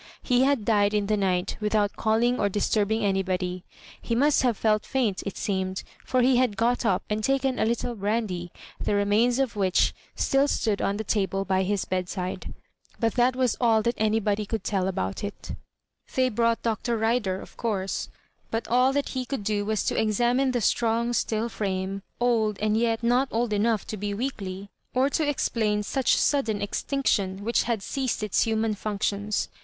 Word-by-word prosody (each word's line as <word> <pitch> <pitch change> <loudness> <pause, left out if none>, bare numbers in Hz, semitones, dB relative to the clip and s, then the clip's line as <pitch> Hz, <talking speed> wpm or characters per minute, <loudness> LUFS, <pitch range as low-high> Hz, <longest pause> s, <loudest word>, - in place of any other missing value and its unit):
He 250 -1 +3
had 275 -6 +1
died 205 -1 +3
in 205 -1 +1
the 215 +1 +1
night 185 -2 0
without 210 -1 +1
calling 230 +3 +1
or 200 - +2
disturbing 210 +2 +1
anybody. 185 -2 -1 0.4
He 230 - -2
must 290 +4 +3
have 245 -5 +1
felt 215 -1 +2
famt, 235 -8 0
it 200 - -5
seismed, 190 -1 -2 0.2
for 255 -1 +1
he 255 0 +4
had 245 -5 +1
got 240 +3 +1
up 185 -2 +1
and 215 +1 -2
taken 270 0 +1
a - - +3
littie 235 +1 -1
brandy, 200 -4 -2 0.3
the 205 - +1
remains 210 +5 +2
of 265 -4 0
which 190 -3 +2 0.2
BtiU 275 +1 +2
stood 210 -6 0
on 200 - 0
the 220 - -3
table 195 -2 0
by 190 -1 +1
his 195 +1 0
bedside; 185 0 -3 0.5
but 225 -2 +1
that 250 0 +3
was 255 -2 +1
all 225 -2 +4
that 235 - +1
anybody 215 -1 +1
could 215 -1 -4
tell 190 -3 0
about 95 - -3
it 205 0 -6 0.6
They 255 -1 +3
brought 230 0 +1
Dr. 230 +1 -1
Rider, 220 -4 0
of - - -12
course; 195 -5 -2 0.4
but 225 +1 -3
all 250 +3 +4
that 285 0 0
he 260 -1 -2
could 255 -3 -4
do 205 0 0
was 215 0 0
to - - 0
examine 240 +5 +2
the 245 -2 0
strong, 230 +2 +1
still 225 -1 0
frame, 195 -3 -3 0.2
old, 225 -4 +2
and 215 0 +1
yet 230 0 +1
not 245 +3 +3
old 230 -1 -1
enough 215 0 +1
to 215 - -5
be 205 0 -3
weakly, 200 -5 -5 0.2
or 265 +3 +3
to 310 -1 +1
explain 215 -6 0
such 265 +5 +1
sudden 230 -8 +1
extinction, 205 -3 -1
which 235 +3 +2
had 230 -4 -1
ceased 260 -3 -2
its 210 - +1
human 220 -1 0
functions. 205 0 -2
220 Hz, 180 wpm, -26 LUFS, 200-240 Hz, 0.6 s, he